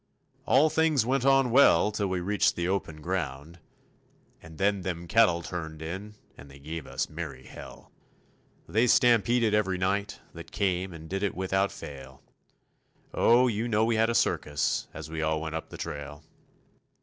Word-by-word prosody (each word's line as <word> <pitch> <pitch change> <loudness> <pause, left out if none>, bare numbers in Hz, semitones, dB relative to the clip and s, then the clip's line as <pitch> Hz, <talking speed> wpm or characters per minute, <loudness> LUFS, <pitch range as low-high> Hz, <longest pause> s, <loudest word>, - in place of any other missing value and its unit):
All 140 +6 +4
things 160 -7 +2
went 130 +1 0
on 135 -2 +4
well 110 -6 +5
till 105 -1 -2
we 95 -1 -2
reached 100 +3 +1
the 85 0 -2
open 85 -5 -3
ground, 80 -2 -4 0.8
And 80 -1 -13
then 100 +1 +1
them 85 -1 -5
cattle 90 -5 +3
turned 80 -3 -6
in 95 +6 -7 0.2
and 70 - -14
they 70 - -14
gave 75 +1 -7
us - - -2
merry 75 -5 -7
hell. - - -12 0.8
They 115 +4 +2
stampeded 120 -2 +3
every 95 -3 +1
night 100 +3 -1
that - - -11
came 95 -1 -1
and 80 -1 -10
did 95 +3 -3
it 100 - -1
without 95 +1 0
fail, 65 -1 -11 0.9
Oh, 120 +2 +4
you 115 -1 -1
know 110 -1 +2
we 115 0 +1
had 110 +1 +2
a 115 - -1
circus 75 -8 0
as 80 0 -9
we 80 -1 -3
all 80 0 0
went 80 0 -5
up 80 - -5
the - - -9
trail. 75 +2 -7
95 Hz, 170 wpm, -27 LUFS, 80-110 Hz, 0.9 s, well